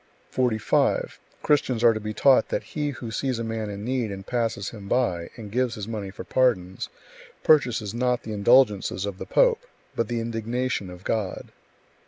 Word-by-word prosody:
45. 120 -4 +2
45. - - -18 0.2
Christians 130 -5 +2
are 115 -1 +7
to 110 - -3
be 105 0 -4
taught 135 +4 +4
that - - -1
he 150 -1 -1
who 120 -4 -6
sees 130 +1 -1
a 115 - -3
man 110 -1 -3
in 100 +1 -6
need, 125 -4 -1
and 95 0 -7
passes 115 -4 -1
him 105 -3 -10
by, 100 -9 0
and 105 -3 -9
gives 125 +1 0
[his 105 -2 -6
money] 105 -4 -4
for 95 - -8
pardons, 95 -8 +1 0.5
purchases 120 -8 +3
not 125 0 0
the 110 - -5
indulgences 105 -4 +3
of 100 -2 -5
the - - -6
pope, - - +3 0.3
but 115 - 0
the 120 +1 -2
indignation 115 -2 -2
of 90 0 -11
God. 105 -4 -2
115 Hz, 185 wpm, -25 LUFS, 100-125 Hz, 0.5 s, are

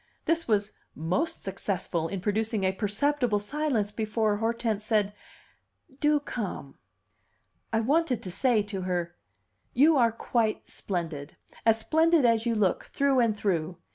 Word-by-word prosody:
This 330 0 0
was 210 -2 +1 0.2
most 275 - -1
successful 185 -4 -2
in 195 +1 -4
producing 215 +1 0
a 190 - +3
perceptible 225 +4 0
silence 225 -1 -1
before 215 -1 0
Hortense 225 -1 -1
said, 210 -2 +1 0.9
"Do 295 0 +3
come." 205 - -6 0.9
I 225 0 +2
wanted 280 0 +1
to 185 - -5
say 235 +1 +2
to 200 -2 -5
her, 175 -2 -2 0.6
"You 295 +4 +5
are 235 -3 +4
quite 225 -1 -1
splendid 160 -6 -5 0.3
as 225 0 +6
splendid 320 +4 +3
as 230 0 +3
you 230 - +1
look, 200 -4 +1
through 275 -2 +1
and 225 -3 +2
through! 175 -4 -1
220 Hz, 140 wpm, -28 LUFS, 195-250 Hz, 0.9 s, as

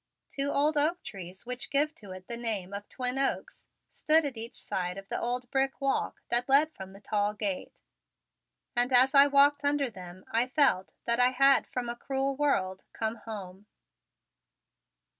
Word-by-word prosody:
Two 275 0 0
old 295 +2 +1
oak 330 +5 +1
trees 185 -1 -9
which 250 0 -5
give 295 +2 +2
to 215 -11 -13
it 185 0 -10
the 235 - -1
name 215 -5 -2
of 205 +1 -7
Twin 255 +1 -1
Oaks 390 - -2 0.2
stood 315 0 +3
at 275 -3 -3
each 230 +1 -6
side 180 0 -4
of 195 0 -10
the - - -3
old 245 +1 -2
brick 270 0 0
walk 275 -1 -2
that 240 +2 +1
led 300 +4 +4
from 190 0 -10
the 195 - -13
tall 205 0 -1
gate, 200 -3 -3 1.0
and 245 +2 +1
as 255 +1 +5
I 280 0 +7
walked 285 0 +4
under 285 -3 0
them 185 -2 -11
I 235 +2 +1
felt 260 -9 +2
that 235 +1 +2
I 250 0 +6
had 275 +2 +3
from 250 -1 -4
a 235 - -4
cruel 270 +2 -2
world 195 -10 -1
come 220 +1 -3
home. 200 -3 -9
245 Hz, 180 wpm, -28 LUFS, 205-275 Hz, 1.0 s, I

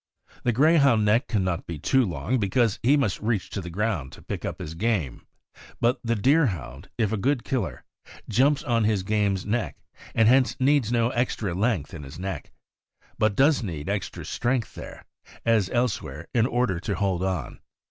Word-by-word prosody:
The 120 - +1
Grey 155 +8 +4
hound 125 -7 +4
neck 110 +6 +3
can 105 -5 0
not 90 -2 -2
be 85 - -5
too 130 - +2
long, 110 +5 -1
because 110 +1 +1
he 140 +5 +4
must 115 -9 0
reach 110 -3 -1
to 100 - -3
the 90 - -7
ground 90 -7 -2
to - - -13
pick - - -5
up - - -4
his 75 - -6
game; 85 - -2 0.5
but 120 +2 +2
the 115 0 0
Deerhound, 100 - +1
if 110 -4 +1
a 110 - 0
good 130 +4 0
killer, 125 -9 -3 0.4
jumps 135 +6 +2
on 115 -4 +1
his 105 -3 +1
game's 100 -2 0
neck, 110 +2 -2 0.4
and 115 -1 +4
hence 130 +1 +3
needs 135 -3 +3
no 120 0 +2
extra 115 -6 -1
length 95 - 0
in 80 - -7
his 70 -1 -10
neck, 95 +1 -5 0.7
but 110 -2 +2
does 140 +3 +4
need 80 -6 -5
extra 100 -1 -3
strength 120 -1 -1
there, - - -10 0.4
as 110 -5 +3
elsewhere, 120 -9 -2
in 115 -1 +3
order 120 -9 0
to 100 +3 -3
hold 95 -3 0
on. 90 -9 -3
110 Hz, 185 wpm, -25 LUFS, 95-125 Hz, 0.7 s, Grey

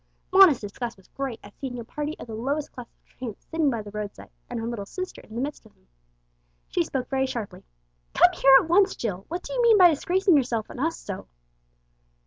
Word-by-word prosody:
Mona's 380 -9 +8
disgust 230 +3 -6
was 190 - -21
great 270 -4 -5
at 205 - -13
seeing 255 -3 -5
a 235 - -5
party 300 +6 -5
of - - -9
the 225 - -9
lowest 280 +7 -2
class 250 -2 -9
of - - -43
tramps 240 -5 -9
sitting 320 -3 +2
by 230 -4 -2
the 205 - -10
roadside, 210 -1 -7 0.2
and 240 - -4
her 225 - -4
little 230 -4 -4
sister 370 - -6
in 220 - -14
the 240 - -2
midst 290 +2 -4
of 220 - -20
them. - - -33 0.8
She - - +1
spoke 265 -2 -3
very 265 -1 0
sharply 235 -6 -6 0.5
"Come - - +6
here 270 0 +6
at - - -4
once, 380 +3 +4
Jill! 195 -5 -4
What 350 +2 -5
do - - -7
you - - +1
mean 465 -2 +6
by 360 -3 +8
disgracing 360 +4 +2
yourself 240 -6 0
and - - -9
us 325 +4 0
so?" 200 -2 -7
260 Hz, 225 wpm, -25 LUFS, 225-320 Hz, 0.8 s, Mona's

